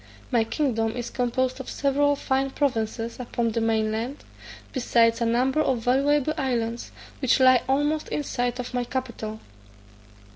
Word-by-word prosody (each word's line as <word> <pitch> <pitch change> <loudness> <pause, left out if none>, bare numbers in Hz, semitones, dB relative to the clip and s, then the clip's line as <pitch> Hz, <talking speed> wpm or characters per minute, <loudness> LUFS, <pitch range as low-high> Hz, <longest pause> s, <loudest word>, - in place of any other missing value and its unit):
My 235 -2 +3
kingdom 225 -2 0
is 240 - -4
composed 255 +1 -1
of 265 - -7
several 285 +1 +2
fine 270 -1 0
provinces 230 -4 -2
upon 235 -2 -1
the 230 - -1
main 220 -1 +1
land, 235 +6 -4 0.5
besides 235 -2 +2
a 235 - +2
number 255 +5 +2
of 265 -4 +1
valuable 280 +4 +2
islands, 235 -3 -2 0.3
which 260 -1 +3
lie 255 -1 +6
almost 295 +3 +1
in 295 - -2
sight 245 -2 -2
of 250 0 -5
my 245 -1 0
capital. 235 -4 -5
250 Hz, 150 wpm, -25 LUFS, 230-270 Hz, 0.5 s, lie